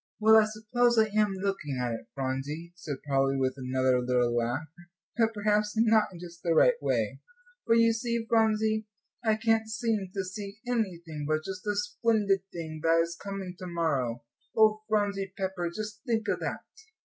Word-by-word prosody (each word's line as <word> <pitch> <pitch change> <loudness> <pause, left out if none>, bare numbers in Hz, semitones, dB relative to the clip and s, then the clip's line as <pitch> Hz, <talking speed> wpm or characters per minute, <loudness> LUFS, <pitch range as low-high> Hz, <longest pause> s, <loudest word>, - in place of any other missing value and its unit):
"Well, 220 +1 +6
I 220 - +6
suppose 225 +3 +1
I 220 -1 +4
am 210 -2 +3
looking 190 -8 -2
at 125 -1 -1
it, 115 - -7
Phronsie," 140 +5 -4
said 145 -6 -6
Polly, 135 -1 +2
with 130 -1 +1
another 130 -1 +1
little 125 -1 +1
laugh, 120 +6 -1 0.5
"but 225 -1 +3
perhaps 210 0 +1
not 220 -1 +5
in 180 - -10
just 170 -1 -11
the 165 -2 +1
right - - +6
way, - - -1 0.5
for 230 - +5
you 230 0 +5
see, 235 0 -2
Phronsie, 220 -1 +2 0.4
I 220 -2 +3
can't 225 0 +1
seem 220 -3 -1
to 195 0 -2
see 200 +2 -7
anything 175 -11 -2
but 155 0 0
just 190 -1 -5
the 210 -1 -1
splendid 205 -2 +1
thing 160 -2 -6
that 165 +1 +4
is 170 0 -5
coming 195 -1 -6
to 185 - -6
morrow. 140 -9 -1 0.3
Oh, 215 -1 +5
Phronsie 200 -3 0
Pepper, 185 -3 -2
just 210 +3 -6
think 225 -2 0
of - - 0
that." - - -4
195 Hz, 175 wpm, -29 LUFS, 155-220 Hz, 0.5 s, Well